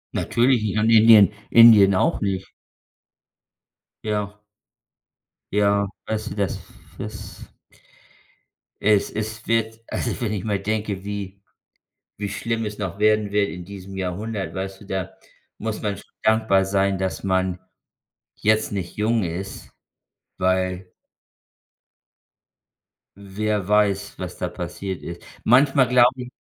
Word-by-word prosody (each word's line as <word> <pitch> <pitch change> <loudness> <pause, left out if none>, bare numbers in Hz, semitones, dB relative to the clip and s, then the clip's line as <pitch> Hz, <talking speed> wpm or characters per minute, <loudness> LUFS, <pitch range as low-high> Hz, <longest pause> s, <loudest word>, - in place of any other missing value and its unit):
Natürlich 120 0 +2
nicht 110 0 -1
und 110 +1 +2
Indien 110 -2 +7 0.2
Indien 110 -5 +8
auch - - +1
nicht. 95 -2 -2 1.6
Ja. 105 -1 -2 1.2
Ja, 100 0 +2 0.2
also 110 -1 -3
das 100 -4 -1
f - - -17 0.2
das - - -9 1.3
es 105 -1 +3
es 110 +1 -4
wird 115 0 0
Also, 120 - -3
wenn 110 -2 -1
ich 95 - -3
mal 100 -3 -1
denke, 105 -1 -3
wie 100 -1 -6 0.8
wie 100 0 -4
schlimm 115 +2 -2
es 105 0 -5
noch 100 -1 -5
werden 105 -1 +2
wird 100 -1 +2
in 90 - -7
diesem 95 +1 -10
Jahrhundert, 95 +3 -4
weißt 95 +1 -5
du, - - -12
da 95 -2 -4 0.4
muss 110 -1 -4
man 105 -2 -2
schon 100 - -15
dankbar 110 -3 +3
sein, 95 0 +1
dass 95 +1 -3
man 95 -1 0 0.8
jetzt 110 0 +1
nicht 90 -3 -5
jung 110 0 +1
ist, 90 +4 -6 0.7
weil 95 0 0 2.3
Wer 100 0 -3
weiß, 105 -2 +1
was - - -6
da - - -2
passiert 95 -2 -6
ist. 85 0 -8 0.2
Manchmal 135 +2 +4
glaube 125 0 +5
ich 125 - -6
100 Hz, 125 wpm, -23 LUFS, 95-110 Hz, 2.3 s, Indien